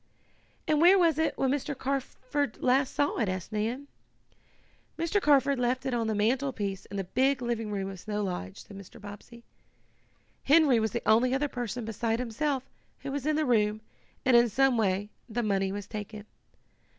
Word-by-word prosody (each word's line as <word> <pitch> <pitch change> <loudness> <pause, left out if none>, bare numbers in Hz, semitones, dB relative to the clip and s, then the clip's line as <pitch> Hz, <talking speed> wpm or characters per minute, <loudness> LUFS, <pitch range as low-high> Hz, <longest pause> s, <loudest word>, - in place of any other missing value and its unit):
"And 305 -1 +2
where 360 +3 +7
was 330 -4 +3
it 320 - 0
when 265 -1 +1
Mr. 285 0 -2
Carford 270 -1 -2
last 260 +2 +2
saw 285 - +1
it?" 215 -5 +1
asked 185 +2 -4
Nan. 230 +6 -2 1.1
"Mr. 335 +5 0
Carford 280 -3 +3
left 250 +1 0
it 265 - -1
on 230 -2 0
the 220 - 0
mantlepiece 215 -3 -1
in 200 - -7
the 195 - -1
big 265 +8 +1
living 235 -3 -2
room 195 -2 -2
of 195 -1 -7
Snow 210 +2 -3
Lodge," 135 - -5
said 200 - -13
Mr. 200 +3 -12
Bobbsey. 210 +3 -11 1.0
"Henry 285 -4 +5
was 220 0 0
the - - -4
only 250 +4 +4
other 290 +2 0
person, 245 -3 -4
beside 225 +1 -1
himself, 255 +3 -2 0.4
who 275 - -5
was 285 0 -3
in 310 - +2
the 310 0 +1
room, 215 -3 +2 0.4
and 255 -2 +5
in 235 0 +6
some 270 +3 +3
way 205 -1 0 0.2
the 235 +2 -2
money 195 -2 0
was 205 0 -5
taken. 210 0 -7
240 Hz, 180 wpm, -28 LUFS, 210-275 Hz, 1.1 s, where